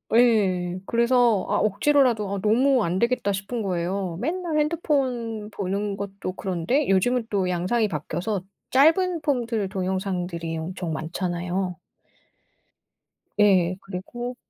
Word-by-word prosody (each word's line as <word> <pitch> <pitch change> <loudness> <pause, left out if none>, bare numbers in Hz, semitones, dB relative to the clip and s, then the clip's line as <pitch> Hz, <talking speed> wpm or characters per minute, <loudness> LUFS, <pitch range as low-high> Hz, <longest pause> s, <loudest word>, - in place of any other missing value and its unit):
예. 190 -7 +3
그래서 235 -3 +3
아 - - +2
억지로라도 215 -1 +2
아 - - -3
너무 245 +4 +3
안되겠다 200 +4 +1
싶은 200 +5 -3
거예요. 180 -1 -2
맨날 330 +2 -2
핸드폰 255 -9 -1
보는 200 +1 -2
것도 195 -2 -5
그런데 190 - -1
요즘은 230 +5 +2
또 195 -3 0
양상이 185 +6 +1
바뀌어서 175 +5 -3 0.3
짧은 325 +5 +4
폼들 235 -8 -1
동영상들이 185 -3 -3
엄청 170 0 -4
많잖아요. 175 +2 -3 1.6
예. 185 -4 +4
그리고 240 +7 -6
200 Hz, 265 characters per minute, -24 LUFS, 185-245 Hz, 1.6 s, 짧은